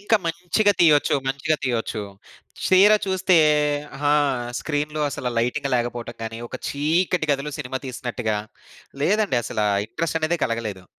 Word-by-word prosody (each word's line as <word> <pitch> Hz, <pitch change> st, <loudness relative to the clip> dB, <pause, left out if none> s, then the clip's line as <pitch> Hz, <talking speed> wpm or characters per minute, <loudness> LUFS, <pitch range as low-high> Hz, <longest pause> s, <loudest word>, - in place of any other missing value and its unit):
ఇంకా 210 Hz, +2 st, +3 dB
మంచిగా 180 Hz, +5 st, +1 dB
తీయొచ్చు 150 Hz, -5 st, +5 dB
మంచిగా 140 Hz, +3 st, 0 dB
తీయొచ్చు. 115 Hz, -3 st, -2 dB, 0.6 s
చీర 190 Hz, +3 st, +6 dB
చూస్తే 190 Hz, -1 st, +2 dB, 0.7 s
ఆ! -, -, +5 dB, 0.5 s
స్క్రీన్‌లో 150 Hz, 0 st, -2 dB
అసలు 125 Hz, -2 st, -3 dB
లైటింగ్ 130 Hz, +5 st, -1 dB
లేకపోవటం 120 Hz, -1 st, -4 dB
గాని, 115 Hz, 0 st, -5 dB
ఒక -, -, -6 dB
చీకటి 160 Hz, +4 st, 0 dB
గదులు 140 Hz, +1 st, -3 dB
సినిమా 130 Hz, -2 st, -4 dB
తీసినట్టుగా 120 Hz, -3 st, -3 dB, 0.7 s
లేదండి. 205 Hz, -, +2 dB
అసల 115 Hz, -, -3 dB, 0.3 s
ఇంట్రెస్ట్ 165 Hz, +7 st, -2 dB
అనేదే 165 Hz, +2 st, 0 dB
కలగలేదు. 110 Hz, -5 st, -3 dB
145 Hz, 125 wpm, -23 LUFS, 120-170 Hz, 0.7 s, చీర